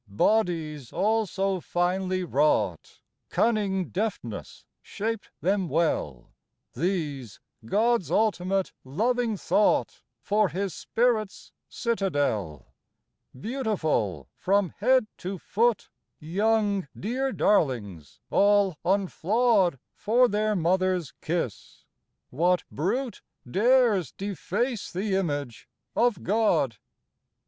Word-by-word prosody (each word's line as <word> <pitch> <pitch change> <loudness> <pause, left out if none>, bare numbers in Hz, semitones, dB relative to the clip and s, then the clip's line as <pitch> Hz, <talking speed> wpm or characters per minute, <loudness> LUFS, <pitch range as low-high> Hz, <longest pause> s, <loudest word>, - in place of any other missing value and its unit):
Bodies 155 - 0
all 215 +4 +1
so 195 +1 -1
finely 185 +2 0
wrought 135 - 0 0.3
Cunning 200 -5 +1
deftness 185 - -4 0.2
shaped 220 0 -4
them 190 -1 +1
well; 135 - -1 0.4
These, 145 - -3 0.3
God's 220 - +1
ultimate, 195 -3 +1
loving 225 - 0
thought 210 - +1 0.2
For 210 -1 +1
His 195 -1 -3
Spirit's 225 -4 -1 0.2
citadel. 145 - -2 0.7
Beautiful 160 - -1
from 195 -1 +1
head 260 -2 +4
to 190 +2 -4
foot, 225 +6 0 0.3
Young, 200 +2 +1
dear 260 +6 -1
darlings 120 - 0
all 200 -4 +3
unflawed 195 - +2 0.2
For 245 +4 +3
their 215 0 0
mother's 185 -2 +1
kiss. 165 - -4 0.5
What 175 +6 +2
brute 235 - -2 0.3
Dares 215 - +3
deface 205 +4 -3
the 195 +3 -2
image 145 -10 -2 0.3
of 235 -6 +2
God 180 - +2
190 Hz, 90 wpm, -26 LUFS, 160-215 Hz, 0.7 s, head